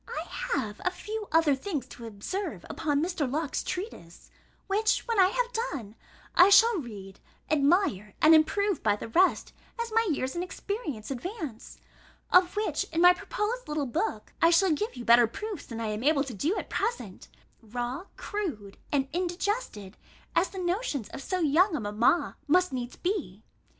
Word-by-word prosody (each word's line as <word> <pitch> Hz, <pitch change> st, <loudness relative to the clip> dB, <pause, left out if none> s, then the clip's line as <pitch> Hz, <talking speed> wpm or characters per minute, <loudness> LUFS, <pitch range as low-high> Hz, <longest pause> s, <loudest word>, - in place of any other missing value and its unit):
I -, -, -4 dB, 0.3 s
have 210 Hz, -, -2 dB
a -, -, +2 dB
few 420 Hz, +3 st, -6 dB
other 325 Hz, -3 st, +4 dB
things 290 Hz, +1 st, -3 dB
to 235 Hz, -, -9 dB
observe 225 Hz, -, -5 dB
upon 295 Hz, -2 st, -1 dB
Mr. 330 Hz, -7 st, -1 dB
Locke's 300 Hz, 0 st, -1 dB
treatise, 360 Hz, -, -7 dB, 0.3 s
which, 430 Hz, +2 st, +1 dB
when 460 Hz, -3 st, +1 dB
I 370 Hz, -, +7 dB
have -, -, -1 dB, 0.2 s
done, 220 Hz, -7 st, -6 dB, 0.4 s
I 360 Hz, -, +7 dB
shall 455 Hz, +2 st, +6 dB
read, 200 Hz, -7 st, -9 dB, 0.3 s
admire, 285 Hz, -, +2 dB
and 310 Hz, +1 st, +7 dB
improve 380 Hz, +4 st, +3 dB
by 210 Hz, -2 st, +2 dB
the 220 Hz, -, -8 dB
rest, 365 Hz, +9 st, +2 dB, 0.3 s
as 465 Hz, -1 st, -3 dB
my 455 Hz, 0 st, +3 dB
years 265 Hz, -4 st, -1 dB
and 345 Hz, -, -2 dB
experience 360 Hz, -, -5 dB
advance; 300 Hz, -, -6 dB, 0.6 s
of 360 Hz, 0 st, +5 dB
which, 425 Hz, +1 st, 0 dB
in 325 Hz, -, -3 dB
my 355 Hz, 0 st, +8 dB
proposed 445 Hz, +7 st, -3 dB
little 300 Hz, -1 st, -1 dB
book, 340 Hz, -, -3 dB
I 330 Hz, -, +6 dB
shall 345 Hz, +2 st, +4 dB
give 365 Hz, +6 st, -1 dB
you 245 Hz, -2 st, -7 dB
better 235 Hz, 0 st, +7 dB
proofs 405 Hz, -, -6 dB
than 230 Hz, -1 st, -6 dB
I 225 Hz, -1 st, -2 dB
am 210 Hz, +2 st, -3 dB
able 290 Hz, -1 st, +3 dB
to 265 Hz, -4 st, -7 dB
do 305 Hz, -, -1 dB
at -, -, -4 dB
present; 475 Hz, +1 st, -3 dB, 0.3 s
raw, 245 Hz, -, -4 dB
crude, 295 Hz, -, -5 dB
and 275 Hz, -2 st, +1 dB
indigested 350 Hz, -, -3 dB, 0.4 s
as 350 Hz, +3 st, +3 dB
the 385 Hz, -, -10 dB
notions 350 Hz, -, -2 dB
of -, -, -8 dB
so 370 Hz, +5 st, -2 dB
young 330 Hz, +4 st, +3 dB
a -, -, -1 dB
mamma 215 Hz, +10 st, +1 dB
must 360 Hz, +1 st, +3 dB
needs 245 Hz, -1 st, -4 dB
be. 325 Hz, -, -3 dB
320 Hz, 170 wpm, -28 LUFS, 240-390 Hz, 0.6 s, my